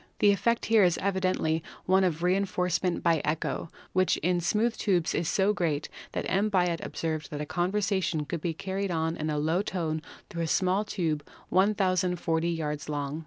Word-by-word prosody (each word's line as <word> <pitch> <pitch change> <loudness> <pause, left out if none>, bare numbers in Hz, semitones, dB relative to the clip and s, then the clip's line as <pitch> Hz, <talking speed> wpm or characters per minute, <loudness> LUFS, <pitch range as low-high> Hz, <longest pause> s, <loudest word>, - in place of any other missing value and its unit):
The 205 - +5
effect 230 +4 +1
here 220 -2 +5
is 175 -2 +3
evidently 185 -4 0 0.2
one 190 +1 +4
of 170 -2 0
reinforcement 180 -1 +1
by 165 -3 +3
echo, 155 +1 -2 0.2
which 185 0 +3
in 180 -1 +2
smooth 220 +7 +1
tubes 180 -5 +1
is 165 - 0
so 200 +1 +2
great 160 -6 -1 0.2
that - - -2
M. 200 +3 +2
Biot 180 -4 +1
observed 155 -2 -3
that 145 - -5
a 150 - -2
conversation 180 -2 0
could 160 +2 -4
be 165 -1 -2
carried 195 +2 -3
on 165 -1 0
in 155 0 -3
a 150 - -1
low 160 +5 +1
tone 160 -6 -2 0.3
through 170 -4 -5
a 165 - 0
small 185 +4 +2
tube 160 -8 -2 0.3
1,040 185 -4 +2
yards 150 -3 -3
long. 145 0 -3
175 Hz, 175 wpm, -28 LUFS, 160-190 Hz, 0.3 s, The